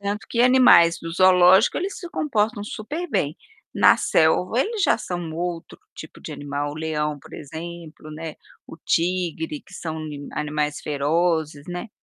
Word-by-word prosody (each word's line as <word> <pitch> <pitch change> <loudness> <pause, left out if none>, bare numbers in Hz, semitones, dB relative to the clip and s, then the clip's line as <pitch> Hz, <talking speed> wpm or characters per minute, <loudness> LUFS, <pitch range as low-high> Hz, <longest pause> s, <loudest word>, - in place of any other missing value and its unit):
Tanto 200 +1 -4
que 235 - -1
animais 245 -10 +6
do 165 - -6
zoológico 185 +2 +5
eles 385 +3 -4
se 350 - -8
comportam 225 -8 -1
super 295 +12 -5
bem, 145 +1 -1 0.4
na - - +6
selva 180 +8 +2
eles 430 - -1
já - - +3
são 175 -6 -5
outro 170 0 -5 0.2
tipo - - -11
de - - -8
animal. 145 0 -4
O - - -9
leão, 150 -1 -2
por - - -17
exemplo, 160 +1 -9
né, 160 0 -7 0.3
o - - -11
tigre 165 -2 -1
que - - -21
são 160 -1 -5
ni 145 -2 -7
animais 150 0 -2
ferozes, 155 0 0
né, 180 +6 -5
170 Hz, 160 wpm, -23 LUFS, 150-200 Hz, 0.4 s, animais